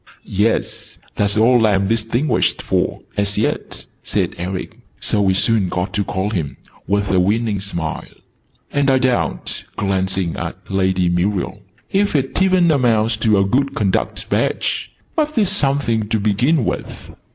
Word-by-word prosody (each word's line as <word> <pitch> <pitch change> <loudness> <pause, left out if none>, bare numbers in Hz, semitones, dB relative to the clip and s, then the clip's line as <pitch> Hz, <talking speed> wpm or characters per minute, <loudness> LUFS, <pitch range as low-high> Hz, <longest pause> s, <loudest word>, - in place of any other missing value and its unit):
"Yes, 105 +4 -1 0.2
that's 100 +1 +1
all 115 0 +5
I'm 95 -2 +2
distinguished 115 +4 0
for, - - 0 0.2
as 100 0 0
yet!" - - -2 0.2
said - - -1
Eric 90 +1 -5 0.2
(so 105 - 0
we 95 -1 +3
soon 105 -1 +1
got 90 +1 -2
to 100 0 +1
call 95 +2 -2
him) 80 -9 -3 0.3
with 100 0 +1
a 95 - +3
winning 105 +2 +1
smile. 85 -5 -4 0.6
"And 145 -1 +2
I 135 - +5
doubt," 130 -1 -1
glancing 95 -3 0
at - - -4
Lady 95 -1 +2
Muriel, 90 +3 0 0.3
"if 200 -2 +1
it 135 +5 0
even 185 -3 +4
amounts 115 -5 +2
to 110 -2 +3
a 100 - +3
good 135 +6 +1
conduct 100 -3 -1
badge! - - -1 0.2
But 305 -4 0
it's 205 -4 +3
something 135 - 0
to 110 - +1
begin 115 +7 +2
with." - - -5
105 Hz, 150 wpm, -19 LUFS, 95-130 Hz, 0.6 s, all